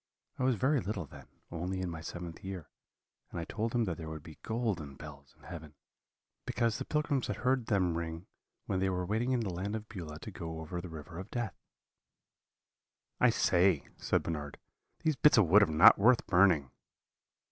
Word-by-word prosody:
I - - 0
was 130 -2 +3
very 135 +6 +2
little 95 -3 -3
then, - - -13 0.2
only 90 +3 -3
in 95 - -2
my 80 -1 -6
seventh 85 0 -7
year, 95 -4 -7 0.6
and - - -5
I 85 - -4
told 115 +5 -3
him 120 - +3
that 90 -7 -2
there 80 -2 -6
would 80 -2 -7
be 80 -2 -12
golden 105 - -2
bells 70 -2 -12
in - - -24
heaven, 80 -4 -9 0.7
because 115 -2 0
the - - -4
pilgrims 150 -4 0
had 105 - -2
heard 125 +1 0
them 95 -5 +2
ring 80 +1 -4 0.4
when 95 - -1
they 95 0 +1
were 90 -1 -1
waiting 110 +7 0
in 125 -2 +2
the 100 -5 -3
Land 100 +5 -3
of 110 0 -6
Beulah 85 -9 -7
to - - -7
go 80 -1 -6
over 85 +2 -5
the 90 - -8
River 80 +2 -8
of 95 - -8
Death.' 115 - -4 1.6
"'I - - +6
say,' 90 -4 +3
said - - 0
Bernard, 75 -3 -4 0.5
'these 155 -4 +1
bits 150 -4 +6
of 110 - +6
wood 95 +6 +6
are 100 - +5
not 80 +4 +7
worth 120 +4 +5
burning.' 90 -8 +4
90 Hz, 195 wpm, -32 LUFS, 80-110 Hz, 1.6 s, not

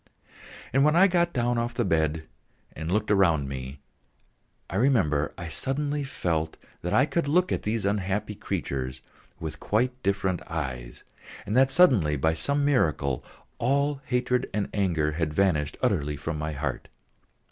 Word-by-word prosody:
And 135 +1 +4
when 150 +2 +4
I 185 +3 +7
got 175 -2 +2
down 120 -2 0
off 120 0 -2
the 120 - 0
bed 80 -3 0 0.5
and 80 +2 -4
looked 105 +2 +1
around 85 -8 +3
me, 65 +1 -6 0.9
I 95 - -3
remember 95 - +2
I 85 - -6
suddenly 145 - -1
felt 80 - -2 0.2
that 90 - -3
I 130 - +4
could 165 0 -1
look 180 +5 +2
at - - 0
these 105 -1 -2
unhappy 100 +1 -1
creatures 65 -8 -4 0.4
with - - -6
quite 125 +4 0
different 95 -3 0
eyes, 65 -7 -5 0.4
and 105 - -2
that 130 +1 +5
suddenly 125 - +4
by 80 +3 +1
some 140 - 0
miracle 75 - +1 0.4
all 140 +2 +1
hatred 125 0 0
and 105 -2 -1
anger 85 -7 +1
had 75 -1 -2
vanished 80 -7 +1
utterly 75 0 +1
from 80 +3 -4
my 75 +1 -3
heart. 70 -2 -4
95 Hz, 155 wpm, -27 LUFS, 75-130 Hz, 0.9 s, I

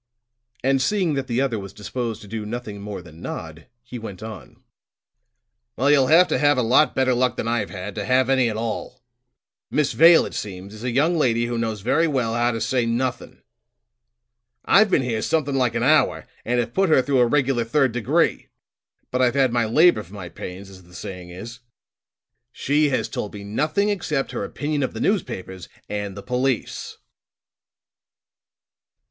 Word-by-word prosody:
And 135 0 +2
seeing 180 +2 +1
that 135 -2 -2
the 120 +2 0
other 125 -5 0
was 100 -1 -9
disposed 115 +1 -5
to - - -12
do 110 +1 -5
nothing 105 -2 -6
more 100 -3 -6
than 80 0 -14
nod, 80 -2 -7 0.2
he 125 0 -8
went 105 -2 -8
on: 110 0 -10 1.1
"Well, 140 +3 +2
you'll 135 -3 +4
have 170 +5 +6
to - - +1
have 145 -1 +3
a 125 - +2
lot 125 +7 +3
better 130 -1 +2
luck 125 0 +1
than - - -3
I've 120 -6 -1
had, 95 +2 -6
to - - -4
have 130 0 +3
any 130 -3 +3
at 110 - -4
all. 115 +1 -5 0.7
Miss 150 -2 +1
Vale, 165 +1 +7
it - - -8
seems, 100 0 -6
is 110 +1 -10
a 125 - -1
young 155 +7 +2
lady 120 -4 +2
who 120 0 -3
knows 110 -3 -2
very 150 +10 +2
well 125 -7 0
how 120 +1 +2
to 115 -1 -2
say 120 +1 0
nothing. 120 +2 -3 1.2
I've 215 +1 +5
been 145 - +2
here 115 -3 -2
something 150 -1 0
like 125 -3 +1
an 115 - 0
hour 150 +4 +3 0.2
and 120 +1 0
have 120 - -2
put 195 -1 +2
her 135 -5 +4
through 135 -1 +1
a 120 - +5
regular 135 -2 +1
third 130 +3 +2
degree; 115 -3 0 0.6
but 125 - 0
I've 125 0 +2
had 130 -3 +2
my 120 -2 +2
labor 150 +2 +4
for 95 +1 -13
my 90 -4 -7
pains, 95 +3 -8
as 95 -1 -13
the 90 0 -18
saying 90 -1 -8
is. 115 +7 -9 0.9
She 145 +2 +1
has 130 - 0
told 105 - -5
me 100 - -8
nothing 155 - 0
except 155 -9 -2
her - - -3
opinion 145 +8 -3
of 130 - -2
the - - -4
newspapers 95 - -2 0.2
and 100 -1 -4
the 100 - -8
police." 125 -1 -2
120 Hz, 190 wpm, -23 LUFS, 105-135 Hz, 1.2 s, Vale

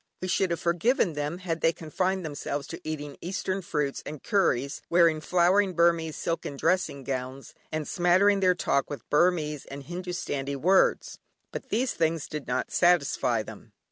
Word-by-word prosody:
We 185 - -4
should 190 0 +1
have 170 - -1
forgiven 175 +2 +1
them, 150 +3 -3
had 170 -3 -4
they 165 - +4
confined 185 +3 -2
themselves 145 -1 -4
to - - -7
eating 150 -2 -5
Eastern 190 +1 -3
fruits 150 -5 -2
and 150 -1 -8
curries, 140 -9 +1
wearing 170 -2 +4
flowing 185 +3 +2
Burmese 170 -2 +2
silken 165 -4 -3
dressing 170 -5 0
gowns, 130 0 -5 0.2
and 155 -1 -3
smattering 185 +3 +3
their 185 -1 +3
talk 140 -5 0
with 145 - -7
Burmese 150 -2 +2
and 140 0 -8
Hindustani 170 -4 -4
words. 185 +8 +2 0.3
But - - -7
these 245 +3 0
things 160 -1 0
did 150 -2 -6
not 125 0 -2
satisfy 140 -9 +2
them. - - -12
165 Hz, 160 wpm, -27 LUFS, 145-180 Hz, 0.3 s, they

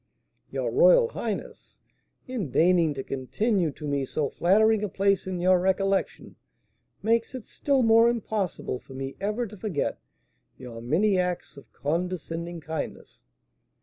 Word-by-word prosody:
"Your - - -2
royal - - +5
highness, - - -6 0.5
in 240 - -3
deigning 165 0 +3
to 135 - -4
continue 175 - 0
to 150 - -7
me 140 -1 0
so 140 +2 -2
flattering 215 +4 +3
a 210 - -1
place 195 +1 +1
in 185 -1 -3
your 185 +1 +4
recollection, 190 +1 -1 0.7
makes 230 +3 +1
it 255 - -7
still 275 -3 0
more 230 +1 +6
impossible 210 - -2
for 130 - -13
me 135 0 -5
ever 210 +4 -1
to 210 -1 -10
forget 190 -7 -2 0.6
your 120 -3 -9
many 185 - +2
acts 180 -2 -2
of 140 - -15
condescending 170 +1 -3
kindness." 160 0 -7
185 Hz, 140 wpm, -26 LUFS, 155-215 Hz, 0.7 s, more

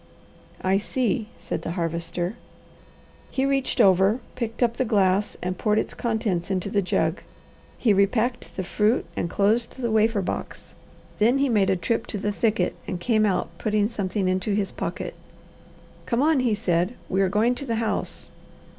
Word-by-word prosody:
"I 190 +1 +3
see," 220 -1 -1
said - - -4
the 165 - -4
Harvester. 170 +3 -2 0.9
He 265 - 0
reached 275 -1 0
over, 195 +4 +5
picked 235 -1 -2
up 235 -1 +1
the - - +2
glass, 200 -3 +2
and 180 0 -3
poured 210 0 +2
its - - -1
contents 220 -7 -1
into 190 0 -1
the 205 -2 +2
jug. 185 - 0 0.6
He 220 -4 +3
repacked 220 +5 +1
the 190 - -1
fruit 210 +6 +1
and 170 - -2
closed 220 +7 +1
the 240 -3 -1
wafer 220 -1 +3
box. - - -5 0.5
Then 235 +5 +4
he 275 0 +2
made 205 -5 +3
a 190 - +3
trip 225 +6 -1
to 210 - -3
the 205 +1 -1
thicket 220 +1 +1
and 180 - -3
came 215 +2 +2
out 180 -3 -1
putting 210 -1 +1
something 200 -3 -2
into 185 +2 0
his 200 -2 -1
pocket. - - -4 0.9
"Come 240 +2 +1
on!" 310 -2 +4
he 240 -4 +2
said. 180 +1 0
"We 190 +1 +1
are 190 - +3
going 215 +5 +2
to 280 +3 -5
the 230 - 0
house." 220 -2 -2
210 Hz, 170 wpm, -25 LUFS, 190-230 Hz, 0.9 s, over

